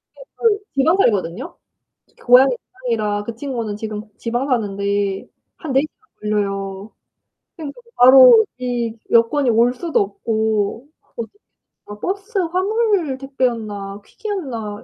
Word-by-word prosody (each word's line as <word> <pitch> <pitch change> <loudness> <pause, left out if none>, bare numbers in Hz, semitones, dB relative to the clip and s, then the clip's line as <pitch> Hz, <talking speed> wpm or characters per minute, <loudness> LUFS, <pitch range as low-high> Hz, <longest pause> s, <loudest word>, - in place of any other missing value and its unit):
걔 - - -12
또 435 -3 +2 0.2
지방 315 +7 +3
살거든요. 205 - 0 0.6
그 - - -20
고향이 250 +1 +6 0.3
지방이라 210 -2 -1
그 230 - -6
친구는 230 -5 -4
지금 215 -1 -5 0.2
지방 240 +3 -2
사는데 200 -4 -1 0.3
한 315 -6 -5
4 265 - +4
시간 310 - -9 0.2
걸려요. 195 -1 -3 0.6
그러니까 320 +6 -8
그 470 - -26
바로 250 -3 +8
이 240 -2 -3
여권이 240 +3 +3
올 235 +2 +3
수도 330 +4 -1
없고 220 +3 -1 0.3
뭐지 230 -1 -6 0.5
막 205 0 -10
버스 400 +3 -3
화물 370 - 0
택배였나 225 -7 -3
퀵이었나 250 - -5
235 Hz, 260 characters per minute, -20 LUFS, 210-280 Hz, 0.6 s, 바로